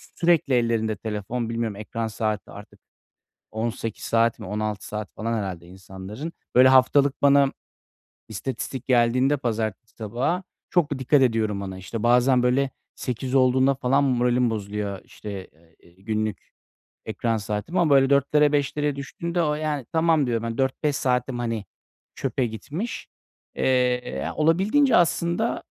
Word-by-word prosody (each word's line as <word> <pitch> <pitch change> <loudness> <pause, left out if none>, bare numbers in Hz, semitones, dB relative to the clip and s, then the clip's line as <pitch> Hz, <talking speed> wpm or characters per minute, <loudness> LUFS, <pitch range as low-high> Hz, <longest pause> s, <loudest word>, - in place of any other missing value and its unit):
sürekli 165 -5 +2
ellerinde 115 -3 +1
telefon. 110 +3 -4
Bilmiyorum, 115 -2 -2
ekran 110 +2 -4
saati 110 -3 -3
artık, - - -12 0.7
18 115 0 -4
saat 115 0 +2
mi, 110 - -8
16 105 0 -3
saat 105 -1 -6
falan 115 +1 -2
herhâlde 90 -5 -5
insanların. 95 - -8 0.2
Böyle, 130 +1 +7
haftalık 130 +2 +4
bana 140 -1 +5 0.8
istatistik 125 +3 -5
geldiğinde 125 +3 +3
pazartesi 110 -3 -3
sabahı 125 - -2 0.3
çok 175 -5 +2
da 140 - -2
dikkat 135 +2 +3
ediyorum 110 -5 +1
ona. 95 -1 -6
İşte, 100 +4 -6
bazen 125 +1 +4
böyle 130 +2 +2 0.3
8 125 +1 -3
olduğunda 130 +1 +4
falan 135 +2 +2
moralim 125 -2 +2
bozuluyor, 100 -2 -4
işte, 100 -3 -8
eee, 80 +1 -27
ııı, - - -28
günlük 110 -3 -3 0.5
ekran 115 -1 -1
saatimi 105 - -2
ama 165 -3 +2
böyle 135 0 +4
4'lere, 145 +1 +3
5'lere 145 0 0
düştüğünde 170 +5 -3
o, 150 -2 +1
yani, 150 -4 -3
"Tamam." 160 -3 +3
diyorum. 115 -2 -1
Hani, 115 0 -4
"4-5 135 +2 0
saatim, 125 0 0
hani, 115 -3 -2 0.5
çöpe 130 - -1
gitmiş." 145 - -5 0.5
Eee, - - -1 0.6
ya, - - -4
olabildiğince 195 - +3
aslında 170 +5 +1
125 Hz, 140 wpm, -24 LUFS, 110-140 Hz, 0.8 s, Böyle